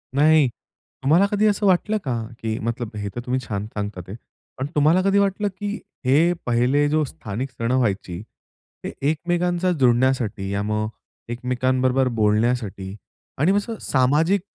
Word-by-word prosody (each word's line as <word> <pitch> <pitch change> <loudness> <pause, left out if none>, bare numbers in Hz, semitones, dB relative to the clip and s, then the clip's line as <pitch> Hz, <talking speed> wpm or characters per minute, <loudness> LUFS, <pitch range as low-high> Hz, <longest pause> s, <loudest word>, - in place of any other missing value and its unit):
नाही. 155 0 +5 0.6
तुम्हाला 160 +8 +5
कधी 210 +1 +2
असं 205 0 +1
वाटलं 195 +3 +3
का? 130 -5 -1 0.3
की 110 -1 -2
मतलब 115 0 -3
हे 105 -1 -3
तर 120 - -3
तुम्ही 125 +1 0
छान 100 -1 -3
सांगतात 105 -4 -5
आहेत. 100 +4 -7
ते - - -42 0.3
पण 130 - -2
तुम्हाला 155 +5 +4
कधी 200 +1 +4
वाटलं, 200 +1 +1
की 205 +1 -3 0.3
हे 155 +7 +4
पहिले 125 +5 +2
जो 155 +1 +2
स्थानिक 130 -3 -5
सणं 115 +1 -1
व्हायची. 100 -7 -1 0.6
ते - - -5 0.2
एकमेकांचा 175 +3 0
जोडण्यासाठी 120 -5 +2
या 100 0 -1
मग 105 +1 -1 0.4
एकमेकांबरोबर 130 +2 +1
बोलण्यासाठी. 105 -3 0 0.4
आणि 155 +7 +3
असं, 225 +3 -3
सामाजिक 150 +9 +2
130 Hz, 150 wpm, -22 LUFS, 110-165 Hz, 0.6 s, नाही